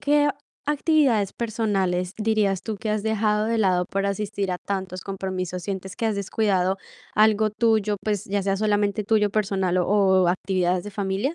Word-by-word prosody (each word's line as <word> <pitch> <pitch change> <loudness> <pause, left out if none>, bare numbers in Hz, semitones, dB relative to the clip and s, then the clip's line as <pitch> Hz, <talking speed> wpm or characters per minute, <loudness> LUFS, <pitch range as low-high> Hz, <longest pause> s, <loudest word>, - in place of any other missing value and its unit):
qué 290 0 +3
ac 280 -1 -1 0.3
actividades 285 - +2
personales 195 -6 -1
dirías 210 -3 +1
tú 220 -2 -4
que 215 - -5
has 210 -1 0
dejado 215 -1 +1
de 230 0 0
lado 185 -3 +2
por 195 +1 -1
asistir 200 -1 -2
a 180 - -2
tantos 190 -2 -4
compromisos? 185 -2 -4
¿Sientes 190 0 -5
que 230 - -1
has 220 - 0
descuidado 195 -2 0 0.4
algo 215 0 +4
tuyo, 215 -2 +1
pues 210 -3 -1
ya 200 0 -1
sea 195 0 0
solamente 205 0 +1
tuyo 210 -1 +2
personal 195 -3 0
o 180 - +1 0.4
o 175 - +3
actividades 180 0 0
de 210 - -6
familia? 200 +8 -2
205 Hz, 175 wpm, -24 LUFS, 190-215 Hz, 0.4 s, algo